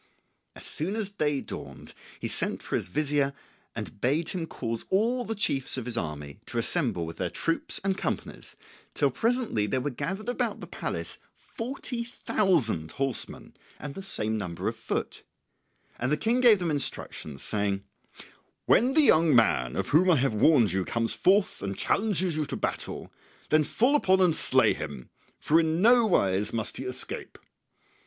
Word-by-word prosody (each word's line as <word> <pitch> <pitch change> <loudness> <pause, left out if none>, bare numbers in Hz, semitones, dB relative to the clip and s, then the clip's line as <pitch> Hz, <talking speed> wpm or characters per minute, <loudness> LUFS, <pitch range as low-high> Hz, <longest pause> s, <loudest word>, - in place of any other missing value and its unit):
As - - -8
soon 180 +7 -2
as 215 -3 -3
day 150 -8 -1
dawned - - -9 0.3
he - - -3
sent - - 0
for - - -3
his - - -2
Vizier 145 +5 0 0.4
and 100 - -7
bade 150 +7 +1
him 175 -4 -3
cause 115 -5 -4
all 235 +6 +1
the 225 -1 -4
chiefs 135 -11 +1
of 125 - -4
his 125 -1 -3
army 75 -4 -5
to 120 - -5
assemble 115 - +1
with 80 0 -8
their 90 - -2
troops 165 - +1
and 195 -1 0
companies, - - -5 0.4
till - - +2
presently 230 - 0
there 130 - 0
were 140 +3 -3
gathered 195 - -5
about 245 - -1
the - - -7
palace - - -5
forty 245 0 -6
thousand 175 - 0
horsemen 135 -3 -1 0.2
and 145 -1 -7
the 195 - -7
same 110 - +3
number 90 -4 -4
of - - -2
foot; - - -4 0.8
and 125 +3 -1
the 150 - +2
King 240 +3 +1
gave 235 -4 +7
them 175 -3 -2
instructions, 80 - -1
saying, 100 -2 0 0.8
"When 250 +5 +3
the 310 - +6
young 160 - +5
man 60 - +2
of 95 0 -2
whom 180 +5 +4
I 175 - +6
have 135 -3 +1
warned 115 - +4
you 95 +1 0
comes 115 +4 0
forth 195 +1 +2
and 100 -1 -4
challenges 190 -5 +1
you 155 -2 -2
to - - -4
battle, - - -4 0.4
then 155 0 +4
fall 250 - +2
upon 190 -9 +3
and 180 -4 +4
slay - - +4
him, 70 -4 -8 0.3
for 160 +2 +3
in 160 0 0
no 235 +3 +5
wise 100 - +1
must 110 -2 -3
he 130 - -6
escape." 125 - -6
150 Hz, 175 wpm, -27 LUFS, -, 0.8 s, gave